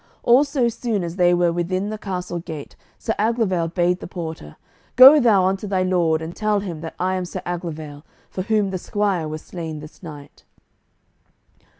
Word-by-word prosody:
All 245 +4 +6
so 280 -4 0
soon 230 -4 -2
as 170 +1 -5
they 175 -1 +4
were 175 -1 +2
within 185 +4 -2
the 215 - -4
castle 180 -3 -4
gate 160 -4 -8 0.2
Sir 225 - -2
Aglovale 210 -6 +1
bade 175 +1 0
the - - -8
porter 160 - -7 0.4
"Go 270 +4 +10
thou 210 -8 +4
unto 195 +2 -1
thy 190 -2 0
lord 170 -4 +1
and 165 +2 -7
tell 215 -1 +1
him 170 -6 -6
that 165 - -7
I 185 +1 0
am 185 -1 -1
Sir 185 +1 -7
Aglovale, 160 -4 -5 0.3
for 185 - -4
whom 210 -1 0
the 185 - -3
squire 195 -5 -1
was 155 0 -6
slain 165 -3 -6
this 150 +1 -12
night." 150 -5 -11
180 Hz, 185 wpm, -22 LUFS, 165-205 Hz, 0.4 s, Go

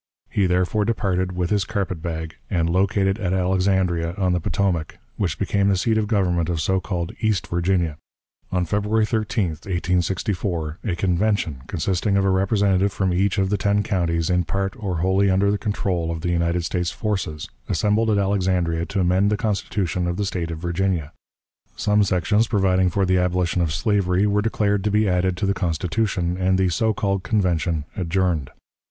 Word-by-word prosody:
He 100 -3 +2
therefore 90 +4 +1
departed, 95 -4 -1
with 90 -1 -2
his 105 -2 +2
carpet 95 -6 -3
bag, 80 -1 -4
and 85 -4 +1
located 95 +3 +1
at 95 -3 -1
Alexandria, 90 -2 +1
on 95 -2 +1
the 90 - +1
Potomac, 85 -2 -1 0.2
which 85 -7 -1
became 100 0 +1
the 95 - +2
seat 110 +4 +1
of 110 -1 +1
government 90 -6 +1
of 85 -2 -1
so 95 +4 +1
called 90 -2 -3
East 110 -3 +1
Virginia. 85 -3 0 0.5
On 90 -1 +1
February 105 +4 +1
13, 110 -3 0
1864, 90 -1 -2
a 95 -6 0
convention, 90 -5 0
consisting 95 +3 0
of 95 - +2
a 95 - +3
representative 100 0 +2
from 95 0 0
each 95 +3 +1
of 95 0 +1
the 105 - +1
ten 100 +1 +2
counties 85 -4 0
in 90 0 +2
part 95 +2 -2
or 95 -6 -3
wholly 95 +2 +3
under 95 +2 +3
the 105 - -1
control 95 -6 -1
of 80 -1 -3
the 85 - -1
United 85 0 0
States 90 -1 -1
forces, 95 -9 -3 0.2
assembled 110 +2 +1
at 105 - +3
Alexandria 90 -4 0
to 100 0 -2
amend 90 +3 +3
the 105 - +1
Constitution 100 -4 -1
of 85 0 -2
the 105 - -1
State 90 -4 -3
of 80 - -4
Virginia. 85 -2 -1 0.6
Some 105 0 +2
sections 100 +4 +2
providing 95 -3 +2
for 95 +2 +1
the 90 0 +2
abolition 90 0 0
of 85 -3 0
slavery 90 +3 +1
were 105 0 +2
declared 105 -2 0
to - - +2
be 105 +1 +2
added 90 0 +1
to 100 - -1
the 100 - +2
Constitution, 90 +1 -1
and 95 0 +2
the 95 -1 +2
so 110 +6 +1
called 100 -2 -1
Convention 85 -7 0
adjourned. 90 -6 0
95 Hz, 180 wpm, -22 LUFS, 85-100 Hz, 0.6 s, a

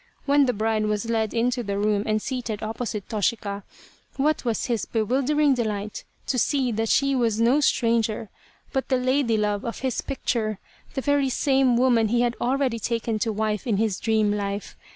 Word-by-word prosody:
When 285 -1 +4
the 250 - +2
bride 215 0 0
was 210 +2 -1
led 220 -2 0
into 245 +1 0
the 200 -3 -3
room 205 0 +1
and 215 0 +1
seated 230 -3 -4
opposite 220 -2 -4
Toshika, 205 -1 -1 0.6
what 300 +3 +1
was 235 -3 -1
his 235 -5 -1
bewildering 275 +6 +2
delight 215 -4 -3 0.2
to 255 - 0
see 265 -1 +1
that 225 0 -1
she 275 0 +3
was 230 -4 +1
no 240 +5 +4
stranger 230 -5 +1 0.4
but 265 -1 -1
the 260 - +3
lady 255 -2 +1
love 210 -1 0
of 230 - -5
his 260 -3 -1
picture, 225 -6 -2 0.4
the 265 - -1
very 285 -1 +2
same 265 -1 +2
woman 240 -3 +3
he 240 +3 +2
had 240 -1 +1
already 255 -1 0
taken 230 0 -1
to 225 - 0
wife 215 +1 -2
in 215 -4 +1
his 215 -3 0
dream 220 -2 +2
life. 200 0 -4
230 Hz, 180 wpm, -24 LUFS, 215-255 Hz, 0.6 s, When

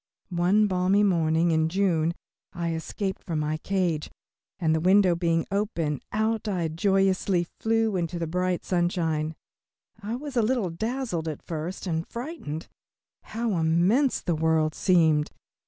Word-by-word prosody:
One 185 +5 +3
balmy 190 +1 +2
morning 165 -3 +2
in 160 0 +2
June, 170 -3 +1 0.4
I 170 -1 -2
escaped 190 +4 -4
from 165 -3 -3
my 155 +1 -1
cage, 175 -3 -1 0.5
and 160 -4 +1
the 160 - +2
window 185 +2 +5
being 165 -1 +1
open, 170 - -1
out 220 +1 0
I 175 -5 -1
joyously 190 +1 +2
flew 225 -2 +1
into 175 -1 -2
the 170 - -2
bright 180 +2 -1
sunshine. 165 -3 0 0.7
I 215 +3 -3
was 280 +1 -7
a 235 - +4
little 220 -5 0
dazzled 220 -3 -3
at 155 -3 -5
first 165 +4 -5
and 165 -2 -2
frightened. 235 - -6 0.6
How 225 -2 -2
immense 180 - +2
the 175 - 0
world 160 -1 +1
seemed! 160 -5 +3
175 Hz, 140 wpm, -26 LUFS, 160-205 Hz, 0.7 s, window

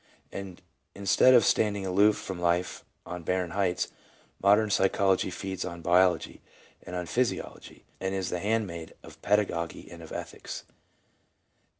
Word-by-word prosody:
And 95 -2 -8 0.3
instead 100 +6 +5
of 120 - +6
standing 100 -2 +2
aloof 100 +3 +4
from 95 -2 -6
life 90 +1 0 0.2
on 90 0 -6
barren 90 +1 -1
heights, 95 -1 0 0.5
modern 105 +2 +4
psychology 95 -1 +2
feeds 95 0 -5
on 85 -1 -7
biology 90 -1 +2 0.4
and 90 - -8
on 90 0 -3
phys 125 +8 +1
iology, - - -12 0.2
and 95 0 -2
is 95 -1 -2
the 90 - -1
handmaid 100 -6 -2
of - - -14
pedagogy 100 -5 0
and - - -10
of - - -11
ethics. - - -7
95 Hz, 140 wpm, -28 LUFS, 90-100 Hz, 0.5 s, of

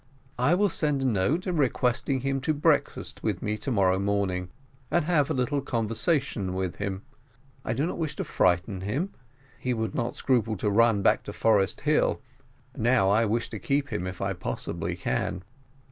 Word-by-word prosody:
I 140 +8 +4
will 205 +3 +3
send 150 -5 0
a - - 0
note, 125 - +1
requesting 135 -5 +1
him 135 0 -1
to 155 +3 0
breakfast 145 - 0
with - - -2
me 105 0 0
to 120 - -3
morrow 95 -5 +3
morning, 100 -3 -1 0.4
and 175 -3 +2
have 155 -4 +2
a - - +1
little 140 +3 0
conversation 115 - -1
with 95 -2 -2
him. 100 -1 -4 0.6
I 110 - -1
do 140 +6 +1
not 175 - -4
wish 155 -3 -2
to - - -2
frighten 90 +2 +1
him: 140 - -2 0.5
he 125 -1 -1
would 110 0 -2
not 120 -1 -2
scruple 115 -5 +1
to 105 +2 0
run 110 -1 +4
back - - +4
to - - -6
Forest 105 -4 +2
Hill - - +2 0.6
now 115 -4 +3
I 110 +3 +4
wish 115 +2 0
to 110 - -5
keep 140 +3 0
him 90 -6 -3
if 90 -1 -6
I 100 0 0
possibly 90 - -4
can." 90 -1 -2
115 Hz, 180 wpm, -27 LUFS, 100-140 Hz, 0.6 s, I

